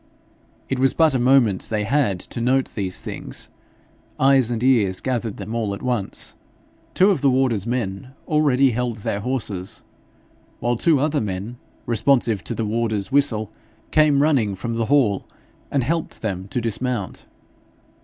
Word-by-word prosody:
It 135 - -2
was 135 0 +3
but 160 -3 +4
a 130 - +1
moment 120 -6 +3
they 105 -2 -1
had 110 -5 +1
to 120 - -6
note 130 +2 +1
these 95 -3 -2
things; - - -7 0.7
eyes 135 -3 +4
and 120 -1 -2
ears 105 -8 +3
gathered 120 -5 -2
them 105 +2 -6
all 110 -4 -1
at - - -11
once. 120 -6 -2 0.6
Two 195 +3 +5
of 190 - 0
the 140 - +4
warder's 125 -5 +1
men 120 -1 -3 0.2
already 140 -4 +3
held 120 -1 -2
their 100 - -1
horses, 105 -6 -4 0.8
while 120 +1 0
two 155 +4 +3
other 150 +1 +1
men, 105 +3 -4 0.3
responsive 120 -4 +2
to - - -3
the 115 - -2
warder's 110 -1 -1
whistle, 130 -7 +1 0.4
came 150 -2 +4
running 125 -10 +2
from 115 +5 -4
the 115 0 -1
hall 120 -7 +2 0.4
and 140 -3 +1
helped 165 0 -3
them 95 -3 -3
to 125 - -2
dismount. 115 -2 -3
120 Hz, 155 wpm, -22 LUFS, 105-135 Hz, 0.8 s, Two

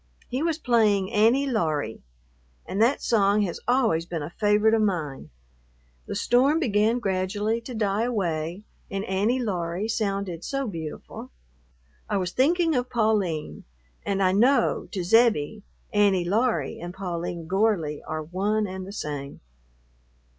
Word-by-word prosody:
He 255 +3 -2
was 325 -1 0
playing 215 - +2
"Annie 230 +6 +4
Laurie," 155 - -1 0.6
and 200 - -2
that 245 +5 +3
song 205 -2 +3
has 180 -4 -3
always 230 -10 +2
been 165 -4 -4
a 150 - -6
favorite 210 +2 +3
of 225 - +3
mine. 165 -10 -2 0.8
The - - -4
storm 270 +6 +3
began 225 -4 +2
gradually 205 +2 -1
to 240 +1 -8
die 210 0 0
away 175 -5 -2 0.3
and 195 +1 -3
"Annie 205 +6 +1
Laurie" 185 -4 -2
sounded 200 -6 -2
so 275 -1 -2
beautiful. 165 -8 -7 0.8
I 205 - +1
was 185 -2 -2
thinking 330 - +2
of 250 -2 -1
Pauline 210 -10 0 0.4
and, 195 -1 0
I 185 - +4
know, 240 +5 +3
to 190 -4 -3
Zebbie, 220 -2 +3 0.3
Annie 200 -4 +3
Laurie 200 - 0
and 175 +1 -7
Pauline 175 -3 -4
Gorley 185 -5 0
are 155 0 -4
one 200 +6 0
and 190 -1 -6
the 200 - -8
same. 145 -7 -5
205 Hz, 140 wpm, -25 LUFS, 175-230 Hz, 0.8 s, Annie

